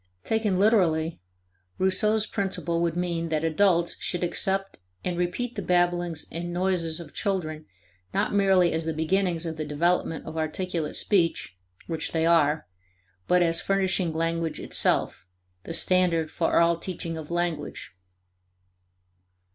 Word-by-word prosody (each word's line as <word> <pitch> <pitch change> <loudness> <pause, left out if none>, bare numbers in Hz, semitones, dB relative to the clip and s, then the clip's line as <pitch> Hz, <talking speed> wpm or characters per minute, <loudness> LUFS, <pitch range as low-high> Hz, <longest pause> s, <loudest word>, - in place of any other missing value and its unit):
Taken 220 -4 0
literally, 175 - +2 0.6
Rousseau's 210 +3 +2
principle 190 -5 -2
would 170 -1 0
mean 170 -2 -2
that 155 0 -1
adults 170 +1 +2
should 175 -1 -1
accept 195 +2 -1 0.3
and 180 - -1
repeat 180 +8 -2
the 205 - -4
babblings 175 -2 +1
and 175 +1 -4
noises 175 -3 0
of 170 - -10
children 155 -7 -3 0.4
not - - 0
merely 190 -3 +4
as 160 0 -1
the 160 -1 -2
beginnings 175 +1 0
of 160 -1 -4
the 155 - -2
development 160 +2 0
of 160 +1 -7
articulate 160 0 -3
speech 170 - +1 0.3
which 165 -2 -3
they 160 -1 +1
are 155 -2 +3 0.6
but 180 0 +4
as 165 -1 +2
furnishing 190 -3 +1
language 165 0 -1
itself 90 - +2 0.4
the - - -6
standard 170 -4 +2
for 165 - 0
all 170 0 +3
teaching 170 -2 -4
of 160 -2 -8
language. 170 -3 -3
170 Hz, 135 wpm, -26 LUFS, 160-185 Hz, 0.6 s, merely